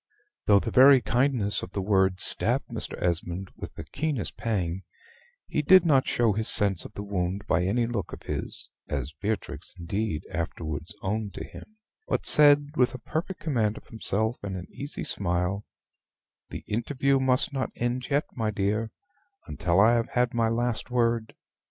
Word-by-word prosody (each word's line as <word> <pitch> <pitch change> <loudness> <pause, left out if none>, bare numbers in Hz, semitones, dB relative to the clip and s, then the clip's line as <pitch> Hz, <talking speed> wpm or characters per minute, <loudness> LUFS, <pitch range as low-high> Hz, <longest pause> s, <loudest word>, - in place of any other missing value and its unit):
Though 100 - +7
the - - -4
very 135 +1 +8
kindness 120 -4 +1
of 90 - -8
the 100 - -1
words 95 -2 +2
stabbed - - +1
Mr. - - -5
Esmond 90 +2 -2
with - - -9
the - - -7
keenest 145 -8 -3
pang, 95 -5 -2 0.6
he - - -1
did 185 +4 +6
not 140 -5 +4
show 115 -3 +2
his 110 +2 +2
sense 95 -4 +2
of - - -10
the 100 - -6
wound 100 0 -2
by 90 -3 +1
any 115 +6 +1
look 115 -5 -3
of - - -9
his - - -4 0.2
(as 70 0 -3
Beatrix, 105 -3 -4
indeed, 90 -1 -3
afterwards 85 +1 -4
owned 105 -1 -2
to - - -5
him), 215 - -12 0.3
but - - -1
said, 145 -1 +6
with 125 -1 +2
a - - -4
perfect 170 +8 -4
command 115 -8 0
of - - -13
himself 110 +1 -1
and 95 -2 -4
an 90 - -7
easy 140 +2 -6
smile, 90 +2 -1 0.8
"The - - -7
interview 135 +4 +1
must 130 +1 +2
not 135 -2 -1
end 120 +1 -2
yet, 145 +1 +2
my 110 -3 -1
dear, 105 +2 -1 0.6
until 85 +4 0
I 110 +4 +6
have 120 0 +1
had 125 +1 +1
my 115 -1 +2
last 120 +1 -1
word. 115 -2 0
110 Hz, 170 wpm, -27 LUFS, 95-125 Hz, 0.8 s, very